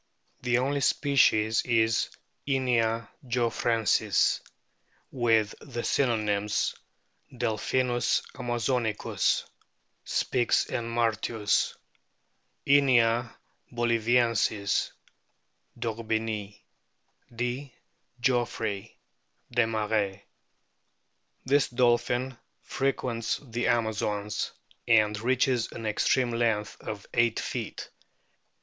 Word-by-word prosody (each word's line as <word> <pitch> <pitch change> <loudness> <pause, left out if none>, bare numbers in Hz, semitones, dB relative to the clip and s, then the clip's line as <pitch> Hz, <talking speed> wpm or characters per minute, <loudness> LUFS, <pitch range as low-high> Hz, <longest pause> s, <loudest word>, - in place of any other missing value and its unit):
The 125 -1 +2
only 140 +3 0
species 115 -6 +3
is 115 -2 +2 0.4
Inia 115 -5 +1 0.2
geoffrensis* 115 -2 +1 0.7
with 115 -4 +2
the 120 -4 -5
synonyms: 105 -5 +1 0.6
Delpkinus 120 +2 0
amazonicus, 120 -3 0 0.6
Spix 120 -2 +1
and 115 -2 -2
Martius; 115 -2 0 0.9
Inia 120 -4 +4 0.4
boliviensis, 115 -3 +1 0.9
d'Orbigny; 110 -2 -3 0.7
D. 125 +3 -3 0.5
geoffroyi, 115 -5 -1 0.6
Desmarest. 110 -4 0 1.2
This 140 +1 +3
dolphin 120 +1 +1 0.3
frequents 125 -4 -1
the 120 -2 -2
Amazons, 105 -3 -1 0.4
and 105 -3 +4
reaches 125 0 +1
an 115 - -7
extreme 120 +3 +1
length 115 -3 0
of 105 -2 -6
eio 120 -1 +3
ht - - -2
feet. - - -5
115 Hz, 70 wpm, -28 LUFS, 110-125 Hz, 1.2 s, Inia